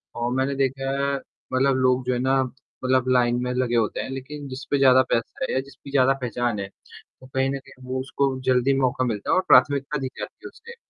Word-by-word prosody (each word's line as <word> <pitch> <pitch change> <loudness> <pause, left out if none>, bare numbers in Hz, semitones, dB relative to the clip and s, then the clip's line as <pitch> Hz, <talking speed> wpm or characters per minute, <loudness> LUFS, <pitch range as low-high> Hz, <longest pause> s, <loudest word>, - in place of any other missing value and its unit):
और 120 +1 -2
मैंने 135 +1 0
देखा 135 0 -1
है 140 0 0 0.4
मतलब 135 +1 +3
लोग 130 0 +2
जो 125 - +1
है 120 - -1
ना 135 +1 +2
मतलब 130 0 -2
लाइन 120 -1 +3
में 125 - -2
लगे 125 -1 0
होते 115 -2 +1
हैं - - -6
लेकिन 140 +2 -7
जिस 130 +1 -7
पे 140 - +3
ज़्यादा 130 -1 +6
पैसा 115 -1 -1
है - - -1
या 130 - +2
जिसकी 135 +1 -10
ज़्यादा 135 -1 +4
पहचान 120 -2 -1
है, 100 - -4
तो 130 +5 -18
कहीं 135 0 0
न 140 - -2
कहीं 130 -1 -17
वो 130 0 -1
उसको 135 0 -1
जल्दी 130 +1 +3
मौका 130 0 +1
मिलता 105 -4 -3
है - - +4
और 185 - +4
प्राथमिकता 145 +1 +4
दी 135 - -2
जाती - - -6
है - - -6
उससे। 470 +1 -13
130 Hz, 230 wpm, -24 LUFS, 125-135 Hz, 0.4 s, ज़्यादा